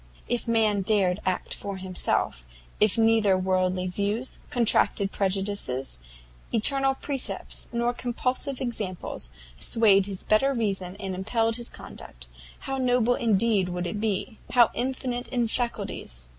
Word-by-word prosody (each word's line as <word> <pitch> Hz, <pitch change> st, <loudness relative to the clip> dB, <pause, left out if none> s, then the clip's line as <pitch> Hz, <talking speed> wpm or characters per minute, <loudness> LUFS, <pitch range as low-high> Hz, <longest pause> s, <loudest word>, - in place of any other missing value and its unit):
If 240 Hz, 0 st, -1 dB
man 220 Hz, -3 st, +2 dB
dared 195 Hz, -2 st, +2 dB
act 185 Hz, -1 st, -1 dB
for 200 Hz, -1 st, -5 dB
himself, 185 Hz, -, -1 dB, 0.3 s
if 210 Hz, 0 st, +3 dB
neither 225 Hz, -4 st, +4 dB
worldly 185 Hz, 0 st, 0 dB
views, 205 Hz, +7 st, -2 dB
contracted 220 Hz, -4 st, +3 dB
prejudices, 190 Hz, -, -2 dB, 0.5 s
eternal 270 Hz, +4 st, +2 dB
precepts, 270 Hz, -1 st, -3 dB
nor 235 Hz, +1 st, 0 dB
compulsive 255 Hz, +2 st, -1 dB
examples, 205 Hz, -, -4 dB, 0.3 s
swayed 200 Hz, -, +4 dB
his 195 Hz, -2 st, -6 dB
better 270 Hz, +6 st, +3 dB
reason 195 Hz, -5 st, -2 dB
and 195 Hz, -2 st, -5 dB
impelled 225 Hz, +4 st, 0 dB
his 240 Hz, -1 st, -7 dB
conduct, -, -, -12 dB, 0.4 s
how 270 Hz, 0 st, -3 dB
noble 245 Hz, -1 st, +3 dB
indeed 215 Hz, -4 st, +2 dB
would 180 Hz, 0 st, -3 dB
he 175 Hz, -, -2 dB
be! 210 Hz, +1 st, -2 dB
_how 240 Hz, -2 st, +5 dB
infinite 250 Hz, -1 st, -3 dB
in 240 Hz, -3 st, 0 dB
faculties! 200 Hz, -, -3 dB
215 Hz, 130 wpm, -26 LUFS, 190-240 Hz, 0.5 s, how